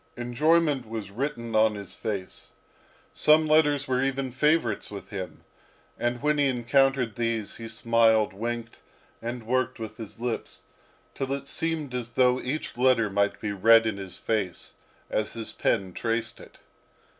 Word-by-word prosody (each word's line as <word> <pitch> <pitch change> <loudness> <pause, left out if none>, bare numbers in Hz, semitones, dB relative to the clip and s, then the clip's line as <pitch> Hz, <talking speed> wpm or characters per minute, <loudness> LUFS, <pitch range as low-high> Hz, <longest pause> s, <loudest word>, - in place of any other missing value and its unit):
Enjoyment 140 +1 +2
was 110 -4 -5
written 115 -1 -4
on 110 0 +4
his 100 -2 -7
face; 100 -4 -5 0.6
some 155 +1 +5
letters 150 -2 +3
were 130 0 +1
even 135 -1 -1
favourites 140 -4 +1
with 100 -1 -8
him; 95 -3 -7 0.5
and 120 +2 -2
when 150 0 +2
he 145 - +4
encountered 130 -1 +2
these, 115 -3 -2
he 115 - -7
smiled, 115 -1 +3
winked, 115 +3 -4 0.4
and 120 0 -5
worked 130 +1 0
with 110 -2 -7
his 115 -1 -9
lips, 120 -1 -4 0.5
till 135 0 -3
it 140 0 -3
seemed 160 -5 -1
as 120 -2 -4
though 125 0 +3
each 140 +5 -4
letter 125 -5 +3
might 100 +1 +1
be 105 - -3
read 115 +3 +6
in 110 -3 -1
his 95 -2 -6
face, 100 -6 -3 0.4
as 110 - -1
his 115 -2 -5
pen 95 -5 0
traced 115 +2 -2
it. - - -14
120 Hz, 155 wpm, -27 LUFS, 110-135 Hz, 0.6 s, read